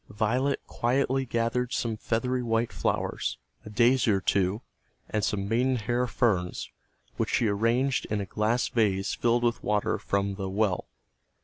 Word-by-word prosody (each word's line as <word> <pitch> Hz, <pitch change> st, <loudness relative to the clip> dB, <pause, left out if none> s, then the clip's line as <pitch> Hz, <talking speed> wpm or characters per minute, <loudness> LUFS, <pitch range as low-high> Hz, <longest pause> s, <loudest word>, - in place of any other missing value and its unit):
Violet 120 Hz, +7 st, 0 dB
quietly 130 Hz, +2 st, 0 dB
gathered 120 Hz, +2 st, -1 dB
some 115 Hz, -2 st, -1 dB
feathery 125 Hz, +4 st, -1 dB
white 115 Hz, 0 st, 0 dB
flowers, -, -, -1 dB, 0.3 s
a -, -, -9 dB
daisy 120 Hz, +3 st, +3 dB
or 100 Hz, -2 st, +3 dB
two, 100 Hz, +4 st, 0 dB, 0.4 s
and 105 Hz, -1 st, -1 dB
some 100 Hz, -1 st, -1 dB
maidenhair 125 Hz, +1 st, +1 dB
ferns, 95 Hz, -9 st, 0 dB, 0.5 s
which -, -, 0 dB
she 115 Hz, -, +2 dB
arranged 115 Hz, +6 st, +1 dB
in 105 Hz, -, -1 dB
a 100 Hz, -, -2 dB
glass 110 Hz, +5 st, 0 dB
vase 100 Hz, -4 st, +1 dB
filled 120 Hz, 0 st, +1 dB
with 120 Hz, -1 st, +1 dB
water 105 Hz, -1 st, 0 dB
from 100 Hz, 0 st, -1 dB
the 95 Hz, -1 st, -4 dB
"well." 100 Hz, -2 st, 0 dB
115 Hz, 145 wpm, -27 LUFS, 105-125 Hz, 0.5 s, daisy